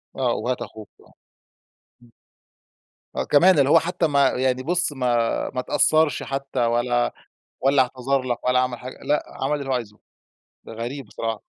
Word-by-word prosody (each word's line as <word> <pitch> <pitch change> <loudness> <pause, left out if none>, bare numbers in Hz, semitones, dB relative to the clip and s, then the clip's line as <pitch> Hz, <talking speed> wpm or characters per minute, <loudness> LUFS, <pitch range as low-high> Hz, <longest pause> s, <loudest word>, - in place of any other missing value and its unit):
آه، 125 -3 0
وهات 125 +3 -2
أخوك 110 -2 -9
آه، - - -22 0.9
امم. 120 - -21 1.0
آه، - - -1
كمان 170 +2 +5
اللي 140 0 +3
هو 165 - +7
حتى 175 0 -1
ما 140 -2 +3
يعني 130 0 0
بُص 175 0 +1
ما 130 -2 -3 0.5
ما 130 - -2
اتأثّرش 155 +4 +2
حتى 135 -1 -4
ولا 120 +1 +1 0.5
والّا 135 0 +4
اعتذر 130 +2 -1
لَك 125 -2 -4
ولا 125 0 +3
عمل 125 -1 -1
حاجة 130 +1 -9
لأ، 150 0 +1 0.2
عمل 145 +2 0
اللي 140 -1 -6
هو - - +1
عايزه. 110 -4 -4 0.7
ده - - -10
غريب 120 +3 -6
بصراحة. 110 0 -4
130 Hz, 165 wpm, -23 LUFS, 120-145 Hz, 1.0 s, هو